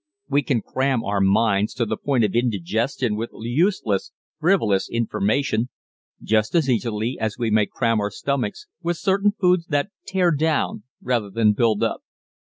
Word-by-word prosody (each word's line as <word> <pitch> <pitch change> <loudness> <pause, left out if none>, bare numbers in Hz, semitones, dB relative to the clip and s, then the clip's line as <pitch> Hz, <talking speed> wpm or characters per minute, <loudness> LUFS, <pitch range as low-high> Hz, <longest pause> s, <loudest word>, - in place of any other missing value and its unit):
We 145 - +2
can 130 -5 -1
cram 130 -2 0
our 100 -1 0
minds 100 +1 +2
to 120 -2 0
the - - -2
point 135 -5 0
of 105 - +1
indigestion 115 +1 0
with 115 +2 -3
useless, 120 - 0 0.3
frivolous 155 - +2
information 115 +1 0 0.5
just 110 +6 +1
as 160 -5 +3
easily 115 -1 -1
as 110 -1 -2
we 115 -3 -1
may 105 -1 +3
cram 115 -3 0
our 105 - -1
stomachs 125 0 -3 0.2
with 175 -1 -1
certain 200 +3 +2
foods 180 -2 +2
that 145 +6 0 0.2
tear 185 -2 +2
down 150 -8 0 0.2
rather 120 -5 0
than 105 +1 +3
build 110 -1 +1
up. - - -1
115 Hz, 160 wpm, -22 LUFS, 105-145 Hz, 0.5 s, as